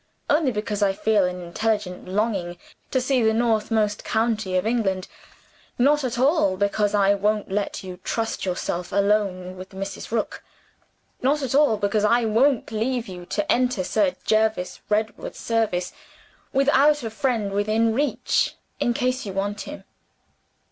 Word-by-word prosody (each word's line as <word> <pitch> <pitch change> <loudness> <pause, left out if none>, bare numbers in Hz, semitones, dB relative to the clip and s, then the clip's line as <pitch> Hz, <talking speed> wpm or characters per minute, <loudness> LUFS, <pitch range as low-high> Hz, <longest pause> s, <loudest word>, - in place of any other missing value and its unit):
Only 295 -2 +3
because 210 -1 -3
I 195 -1 +3
feel 210 -1 +2
an 180 0 -4
intelligent 200 0 -2
longing 190 -3 -1 0.3
to 260 - +1
see 255 0 +1
the 220 -1 +3
northernmost 220 -2 +1
county 220 -4 0
of 185 - 0
England 200 -5 0 0.7
not 290 +4 +3
at 250 -2 -2
all 265 - +3
because 205 +1 +1
I 200 0 +4
won't 205 0 0
let 200 0 -2
you 185 -1 -7
trust 225 -1 -2
yourself 180 -1 -3
alone 195 -2 0
with 185 +1 -10
Mrs. 195 0 -6
Rook! 225 -1 -2 0.8
Not 280 +3 +1
at 265 - -2
all 285 -6 +4
because 205 +1 0
I 235 +2 +3
won't 235 +4 +2
leave 235 +2 -1
you 180 -2 -9
to 205 - -1
enter 245 -5 +1
Sir 190 -1 +1
Jervis 215 -4 +1
Redwood's 215 +1 -1
service 215 -6 -1 0.6
without 285 +1 +4
a 225 - -4
friend 225 -4 -1
within 215 +3 +2
reach 285 +5 0 0.2
in 240 - +1
case 255 +2 0
you 195 - -5
want 200 +2 -2
him! - - -8
215 Hz, 150 wpm, -24 LUFS, 195-240 Hz, 0.8 s, I